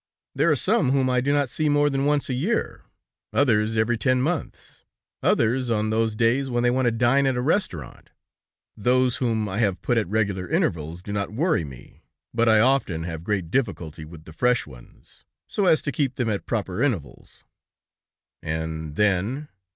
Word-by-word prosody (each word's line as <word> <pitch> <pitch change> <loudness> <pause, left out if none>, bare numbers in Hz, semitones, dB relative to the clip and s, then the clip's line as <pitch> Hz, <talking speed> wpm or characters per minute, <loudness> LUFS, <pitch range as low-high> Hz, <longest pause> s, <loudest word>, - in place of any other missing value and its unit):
There 150 +5 +2
are - - +4
some 170 - +1
whom 130 -2 +2
I 125 -1 +2
do 140 +3 0
not 145 -1 +2
see 155 +5 -1
more 145 0 +3
than 135 -1 0
once 145 -1 +1
a 130 - -2
year, 170 - -2 0.5
others 110 -5 +2
every 110 +1 +1
ten 130 0 +2
months, 155 +4 -4 0.4
others 120 +2 +1
on 110 -1 0
those 110 0 0
days 120 +5 +1
when 120 -1 0
they 120 - +3
want 130 0 +1
to - - +3
dine 125 +4 +2
at 130 - +1
a - - -1
restaurant, 125 - -2 0.7
those 125 +3 +2
whom 115 -4 0
I 100 +1 -3
have 100 -5 +1
put 120 -1 +2
at 110 - -2
regular 100 -4 -1
intervals 80 +2 -1
do 100 - -6
not 100 -1 -2
worry 155 - +1
me, 65 -5 -12 0.3
but 115 0 +2
I 110 -1 +5
often 115 -9 +2
have 80 -1 -6
great 95 -4 -2
difficulty 85 - -2
with 80 0 -12
the 80 - -12
fresh 125 +8 +1
ones, 65 -4 -17 0.2
so 200 -3 0
as 160 - +4
to 145 - -2
keep 135 -1 -1
them 120 -4 -1
at 100 - -4
proper 100 -5 -2
intervals." 110 - -3 1.0
"And 80 -1 -4
then...." 105 - 0
115 Hz, 185 wpm, -24 LUFS, 95-135 Hz, 1.0 s, I